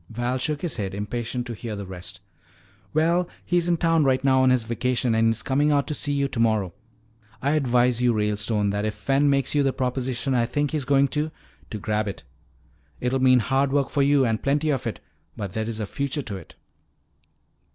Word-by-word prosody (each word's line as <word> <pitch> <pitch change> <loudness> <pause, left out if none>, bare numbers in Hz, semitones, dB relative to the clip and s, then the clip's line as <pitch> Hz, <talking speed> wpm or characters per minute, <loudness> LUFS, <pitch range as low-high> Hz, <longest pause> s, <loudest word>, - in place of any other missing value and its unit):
Val 120 +3 -2
shook 150 +3 -2
his 170 -6 -2
head, 95 -2 -3
impatient 120 +4 -3
to 120 - -5
hear 110 0 -6
the 100 -1 -6
rest. 90 0 -9 0.7
"Well, 170 +3 +2 0.2
he's 175 -1 +1
in 175 -1 +2
town 165 -1 +3
right 130 -1 +2
now 130 -1 +4
on 130 - +4
his 130 -2 +3
vacation 120 +1 0
and 115 0 +3
he's 115 0 0
coming 145 +3 +2
out 140 -1 +2
to 150 - -3
see 145 0 -1
you 140 -1 +1
tomorrow. 110 -7 0 0.7
I 140 - 0
advise 125 -4 +2
you, 125 -1 +4
Ralestone, 105 -1 0
that 105 +1 -2
if 110 -1 -2
Fen 140 +1 +2
makes 140 -2 +1
you 145 - +3
the 135 -1 +1
proposition 130 0 -2
I 120 -2 +2
think 145 +3 -1
he's 150 -4 -2
going 140 +1 +4
to, 150 +3 -1 0.4
to 110 - -4
grab 105 +1 -1
it. 100 - -6 0.8
It'll 130 +1 0
mean 130 -1 +5
hard 135 +3 +1
work 140 -1 +1
for 145 - +1
you 140 -1 +4
and 110 -2 0
plenty 145 +3 +1
of 135 - -2
it, - - -4 0.4
but 100 -3 -5
there 110 +1 -2
is 115 -1 -4
a 105 - -2
future 140 +5 -3
to 105 - -5
it." 95 -4 -11
130 Hz, 210 wpm, -24 LUFS, 110-140 Hz, 0.8 s, mean